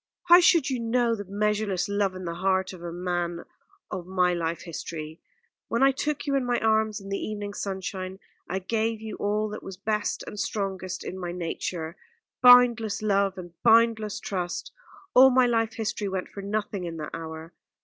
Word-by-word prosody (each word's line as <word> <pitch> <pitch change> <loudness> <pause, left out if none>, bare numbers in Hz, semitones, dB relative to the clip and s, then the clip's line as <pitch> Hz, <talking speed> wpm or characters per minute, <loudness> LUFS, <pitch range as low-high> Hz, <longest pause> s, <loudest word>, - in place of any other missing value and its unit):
How 350 +1 +10
should 340 -4 +5
you 255 - -1
know 235 0 +1
the 205 -2 -4
measureless 205 -1 0
love 200 -2 0
in 185 0 -7
the 170 - -3
heart 190 +1 0
of 180 - -11
a 170 -1 -5
man 175 -1 -2 0.5
of 180 -1 -5
my 180 -1 +2
life 170 -1 -2
history? 160 -2 -7 0.5
When 235 +3 +1
I 275 - +6
took 290 +1 -2
you 280 - -1
in 275 -1 +2
my 245 -1 +1
arms 220 -1 +2
in 195 0 -10
the 195 - -2
evening 205 -1 -4
sunshine, 190 -1 -4 0.3
I 190 - -1
gave 220 +3 -1
you 220 0 -6
all 210 +1 0
that 210 - -6
was 190 -1 -8
best 210 +1 -1
and 210 - -7
strongest 190 -3 -3
in 190 - -6
my 175 -1 -4
nature 170 -1 -4 0.4
boundless 245 -4 +6
love 200 -2 +2
and 175 -2 -8
boundless 225 -2 +4
trust. 180 -3 -4 0.4
All 265 +1 +9
my 255 -1 +4
life 225 -2 +1
history 220 -2 -2
went 190 -1 -3
for 200 - -8
nothing 200 -2 -3
in 165 -1 -5
that 155 -1 -6
hour. 160 0 -7
200 Hz, 185 wpm, -26 LUFS, 180-225 Hz, 0.5 s, How